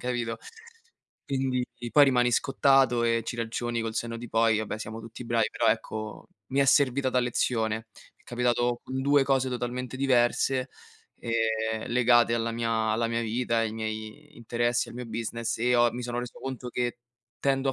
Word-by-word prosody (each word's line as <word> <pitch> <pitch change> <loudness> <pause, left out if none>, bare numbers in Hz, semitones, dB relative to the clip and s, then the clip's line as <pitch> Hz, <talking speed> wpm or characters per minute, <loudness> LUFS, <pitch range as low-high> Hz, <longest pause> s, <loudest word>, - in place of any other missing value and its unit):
capito? 120 -2 -2 0.9
Quindi, 130 -2 0 0.3
poi 145 -1 +8
rimani 125 -2 +3
scottato 135 -2 +3
e 115 0 +2
ci 120 - -4
ragioni, 115 0 -2
col 115 -1 -4
senno 115 0 -3
di 120 -1 -8
poi, 115 -1 +3
vabbè, 110 0 -3
siamo 110 +1 -6
tutti 115 +2 -9
bravi. 115 -1 +1
Però, - - -1
ecco, 110 0 -4 0.2
mi 135 - -2
è - - +5
servita 135 -1 +3
da 125 - +2
lezione. 115 -2 -1 0.3
Mi - - -30
è - - -35
capitato 120 0 0
con 130 0 -4
2 145 0 +4
cose 135 -1 +1
totalmente 125 +1 -4
diverse, 130 0 +2 0.5
ehm, 110 -1 -1
legate 120 -1 +4
alla 115 0 -1
mia 115 0 -2 0.2
alla 115 +1 +1
mia 115 0 -1
vita, 115 +1 0
ai 115 -1 0
miei 110 +7 -6
interessi, 120 +1 0
al - - -10
mio 125 0 -6
business 115 0 -3
e 125 +2 +2
ho 120 -1 +4
mi 125 +1 -5
sono 120 0 -3
reso 125 - -8
conto 130 -2 -5
che 120 0 -2 0.4
tendo 135 0 +1
a - - -4
120 Hz, 180 wpm, -27 LUFS, 115-125 Hz, 0.9 s, poi